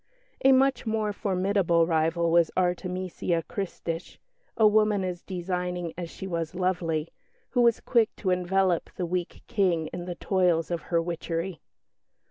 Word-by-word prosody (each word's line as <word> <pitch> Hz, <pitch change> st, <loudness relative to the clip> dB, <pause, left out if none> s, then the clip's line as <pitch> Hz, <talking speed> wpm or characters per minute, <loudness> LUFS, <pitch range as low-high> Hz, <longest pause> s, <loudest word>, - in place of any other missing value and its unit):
A 270 Hz, -, +7 dB
much 265 Hz, -2 st, +3 dB
more 215 Hz, -1 st, 0 dB
formidable 185 Hz, -4 st, +2 dB
rival 165 Hz, +1 st, +1 dB
was 170 Hz, -1 st, +4 dB
Artemesia 180 Hz, -1 st, -1 dB
Christich, 175 Hz, -5 st, -5 dB, 0.4 s
a 220 Hz, -, +5 dB
woman 210 Hz, -2 st, +4 dB
as 180 Hz, -1 st, -3 dB
designing 180 Hz, -2 st, -3 dB
as 175 Hz, -1 st, -5 dB
she 190 Hz, -, -8 dB
was 170 Hz, -2 st, -3 dB
lovely, 170 Hz, -4 st, -1 dB, 0.4 s
who 245 Hz, -, +2 dB
was 235 Hz, -1 st, +4 dB
quick 230 Hz, -3 st, +2 dB
to 185 Hz, -, -1 dB
envelop 180 Hz, 0 st, +1 dB
the 180 Hz, -, -2 dB
weak 175 Hz, 0 st, -3 dB
King 170 Hz, -6 st, +1 dB
in 175 Hz, 0 st, -5 dB
the 175 Hz, -1 st, -5 dB
toils 180 Hz, -3 st, +1 dB
of 170 Hz, -2 st, -1 dB
her 170 Hz, -, +3 dB
witchery. 165 Hz, 0 st, -3 dB
180 Hz, 145 wpm, -27 LUFS, 170-195 Hz, 0.4 s, A